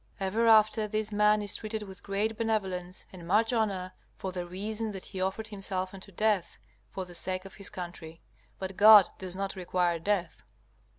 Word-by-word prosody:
Ever 205 Hz, +4 st, +1 dB
after, 215 Hz, -1 st, +5 dB
this 215 Hz, 0 st, -1 dB
man 210 Hz, 0 st, +3 dB
is 205 Hz, -, +1 dB
treated 215 Hz, 0 st, -4 dB
with 190 Hz, -1 st, -11 dB
great 205 Hz, +3 st, -1 dB
benevolence 190 Hz, -5 st, -2 dB
and 175 Hz, -2 st, -10 dB
much 220 Hz, +6 st, +3 dB
honor, 195 Hz, -5 st, -1 dB, 0.2 s
for 190 Hz, -, -5 dB
the 180 Hz, -1 st, -5 dB
reason 210 Hz, +5 st, -3 dB
that 190 Hz, -, -6 dB
he 190 Hz, -2 st, -6 dB
offered 195 Hz, +4 st, -2 dB
himself 190 Hz, -2 st, -4 dB
unto 195 Hz, +1 st, -10 dB
death 210 Hz, -1 st, 0 dB, 0.3 s
for 190 Hz, -, -5 dB
the 180 Hz, -, -12 dB
sake 185 Hz, +2 st, -3 dB
of 195 Hz, -, -10 dB
his 200 Hz, -, -5 dB
country. 170 Hz, -2 st, -8 dB, 0.3 s
But 190 Hz, 0 st, -6 dB
God 210 Hz, -2 st, +9 dB
does 185 Hz, -1 st, -4 dB
not 195 Hz, +1 st, -3 dB
require 180 Hz, -2 st, 0 dB
death. 180 Hz, -1 st, -1 dB
195 Hz, 180 wpm, -29 LUFS, 185-215 Hz, 0.3 s, God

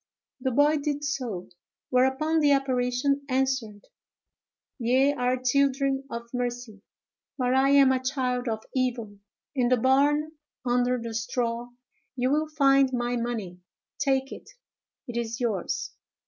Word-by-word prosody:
The 260 Hz, +1 st, -1 dB
boy 290 Hz, +4 st, +3 dB
did 290 Hz, 0 st, -2 dB
so; 250 Hz, -10 st, -3 dB, 0.4 s
whereupon 265 Hz, +5 st, +2 dB
the 290 Hz, -2 st, +4 dB
apparition 270 Hz, +1 st, 0 dB
answered, 255 Hz, -6 st, -1 dB, 0.9 s
"Ye 260 Hz, +4 st, +3 dB
are 250 Hz, -1 st, 0 dB
children 275 Hz, +1 st, +1 dB
of 235 Hz, -1 st, -6 dB
mercy, 245 Hz, -4 st, -4 dB, 0.6 s
but 250 Hz, -2 st, +1 dB
I 265 Hz, +1 st, +4 dB
am 275 Hz, -1 st, +6 dB
a 260 Hz, 0 st, 0 dB
child 255 Hz, -2 st, -1 dB
of 220 Hz, -1 st, -3 dB
evil; 235 Hz, -6 st, -2 dB, 0.3 s
in 250 Hz, -4 st, +1 dB
the 255 Hz, -, +4 dB
barn, 285 Hz, +5 st, +2 dB, 0.3 s
under 245 Hz, 0 st, +1 dB
the 230 Hz, -1 st, -6 dB
straw, 235 Hz, +1 st, -2 dB, 0.5 s
you 255 Hz, 0 st, 0 dB
will 305 Hz, +2 st, +1 dB
find 275 Hz, -3 st, +3 dB
my 245 Hz, -1 st, -1 dB
money. 225 Hz, -7 st, -4 dB, 0.4 s
Take 270 Hz, -1 st, +1 dB
it; -, -, -10 dB, 0.6 s
it 240 Hz, -1 st, -5 dB
is 230 Hz, -1 st, -3 dB
yours." 235 Hz, -, -2 dB
255 Hz, 135 wpm, -26 LUFS, 240-275 Hz, 0.9 s, am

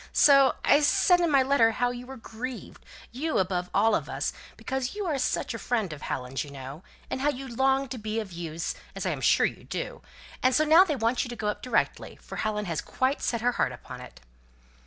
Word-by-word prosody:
so 275 Hz, -2 st, +6 dB
I 285 Hz, -, +6 dB
said 355 Hz, +4 st, +4 dB
in 340 Hz, -, +2 dB
my 275 Hz, -3 st, +4 dB
letter 255 Hz, -4 st, +3 dB
how 245 Hz, +2 st, 0 dB
you 245 Hz, 0 st, -8 dB
were 265 Hz, 0 st, -8 dB
grieved 245 Hz, +2 st, -8 dB, 0.3 s
you 305 Hz, +6 st, -2 dB
above 180 Hz, -1 st, 0 dB
all 225 Hz, 0 st, +3 dB
of -, -, -1 dB
us, -, -, -2 dB, 0.2 s
because 265 Hz, +4 st, -3 dB
you 415 Hz, -1 st, -3 dB
are 300 Hz, -6 st, -1 dB
such 250 Hz, -, -1 dB
a 230 Hz, -, -5 dB
friend 220 Hz, -9 st, -1 dB
of 150 Hz, -, -10 dB
Helen's, 130 Hz, +1 st, -3 dB
you 145 Hz, -, -10 dB
know 140 Hz, +2 st, -9 dB, 0.3 s
and 260 Hz, -, -2 dB
how 290 Hz, -, +3 dB
you 270 Hz, -1 st, -4 dB
longed 265 Hz, +2 st, +1 dB
to 255 Hz, -, -4 dB
be 215 Hz, +1 st, -3 dB
of 210 Hz, -4 st, -6 dB
use, 170 Hz, -1 st, -4 dB, 0.2 s
as -, -, -4 dB
I -, -, +1 dB
am -, -, -4 dB
sure -, -, +4 dB
you -, -, -4 dB
do -, -, -5 dB, 0.4 s
and 255 Hz, 0 st, +3 dB
so 310 Hz, -, +4 dB
now 320 Hz, +4 st, +8 dB
they 320 Hz, -6 st, -1 dB
want 235 Hz, 0 st, +1 dB
you -, -, -7 dB
to 240 Hz, -, -5 dB
go 215 Hz, -2 st, -2 dB
up 210 Hz, -, -4 dB
directly, 255 Hz, -, -1 dB
for -, -, -9 dB
Helen 210 Hz, -1 st, -1 dB
has 165 Hz, -4 st, -2 dB
quite 260 Hz, +2 st, -1 dB
set 235 Hz, -2 st, -1 dB
her 245 Hz, +1 st, +2 dB
heart -, -, 0 dB
upon -, -, -10 dB
it." -, -, -13 dB
245 Hz, 235 wpm, -27 LUFS, 210-270 Hz, 0.4 s, now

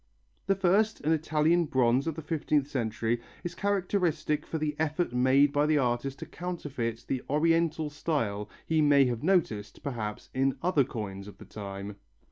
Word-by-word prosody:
The 195 Hz, -, +3 dB
first, 195 Hz, +4 st, +2 dB
an 155 Hz, -, +1 dB
Italian 160 Hz, +2 st, +2 dB
bronze 130 Hz, 0 st, +2 dB
of 160 Hz, -, -1 dB
the 160 Hz, -, -7 dB
fifteenth 150 Hz, -2 st, 0 dB
century, 115 Hz, -3 st, -1 dB, 0.2 s
is 175 Hz, -, -4 dB
characteristic 180 Hz, -6 st, 0 dB
for 160 Hz, -, -3 dB
the 150 Hz, -1 st, -2 dB
effort 160 Hz, -2 st, 0 dB
made 130 Hz, +3 st, +4 dB
by 145 Hz, +1 st, +3 dB
the 155 Hz, -1 st, +3 dB
artist 130 Hz, +1 st, 0 dB
to -, -, -7 dB
counterfeit 135 Hz, -10 st, -4 dB
the 130 Hz, -2 st, -1 dB
Oriental 160 Hz, 0 st, +2 dB
style 115 Hz, -10 st, -2 dB, 0.2 s
he 160 Hz, -1 st, +2 dB
may 145 Hz, -2 st, +5 dB
have 120 Hz, -2 st, -2 dB
noticed, 130 Hz, -, 0 dB
perhaps, 110 Hz, -6 st, -5 dB
in 135 Hz, 0 st, +1 dB
other 170 Hz, -7 st, +3 dB
coins 100 Hz, -4 st, -6 dB
of 105 Hz, -, -11 dB
the -, -, -12 dB
time. 100 Hz, -1 st, -7 dB
145 Hz, 165 wpm, -29 LUFS, 120-160 Hz, 0.2 s, may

